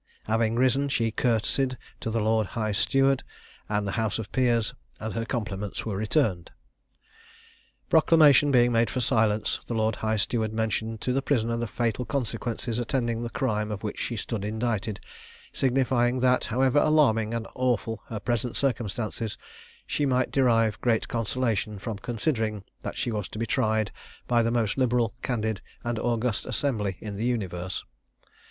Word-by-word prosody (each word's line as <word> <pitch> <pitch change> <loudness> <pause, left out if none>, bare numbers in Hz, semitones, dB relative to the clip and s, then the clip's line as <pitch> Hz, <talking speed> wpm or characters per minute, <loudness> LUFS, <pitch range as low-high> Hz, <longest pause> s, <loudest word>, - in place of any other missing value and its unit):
Having 110 +1 +1
risen, 130 +3 +2
she 115 -4 +1
courtesied 125 +3 +1 0.2
to - - -3
the 115 +1 0
lord 110 -1 +2
high 110 -1 0
steward 135 +6 +3 0.5
and 105 -1 0
the 100 - -2
house 110 -3 0
of 110 -2 -6
peers, 120 -2 +2 0.3
and 110 0 -4
her 115 0 -2
compliments 105 -5 -3
were 110 -3 -2
returned. 105 - +1 1.4
Proclamation 155 -3 +6
being 120 -3 +5
made 115 -1 +3
for 125 - -2
silence, 110 -3 +1
the 120 - -2
lord 110 -1 +1
high 110 0 0
steward 110 0 0
mentioned 110 0 -1
to 125 - 0
the 135 - +1
prisoner 115 -5 +1
the 120 0 -2
fatal 120 +1 -1
consequences 120 -2 -2
attending 120 -1 -1
the 120 - -3
crime 105 -4 -1
of 105 -1 -5
which 105 - -4
she 120 - -2
stood 105 0 -3
indicted, 110 -1 -2 0.5
signifying 130 -1 +2
that, 125 0 +3
however 130 +4 +3
alarming 130 -9 +3
and 115 -1 -2
awful 120 -3 0
her 115 -5 -4
present 120 +2 -1
circumstances, 115 -3 -2 0.5
she 145 - 0
might 130 -1 +1
derive 115 -5 +3
great 115 -3 +1
consolation 115 -2 -1
from 105 +1 -5
considering 115 -3 -1 0.2
that - - -5
she 120 - -1
was 105 -3 -2
to - - -9
be 115 - -1
tried 110 -3 +1 0.3
by 120 -1 +3
the 115 - +1
most 115 0 0
liberal, 120 -3 +2
candid, 110 -5 -1 0.2
and 120 -1 -2
august 120 -1 0
assembly 105 -9 -1
in 105 -2 -5
the 110 - -2
universe. 95 -6 -2
115 Hz, 160 wpm, -27 LUFS, 110-125 Hz, 1.4 s, Proclamation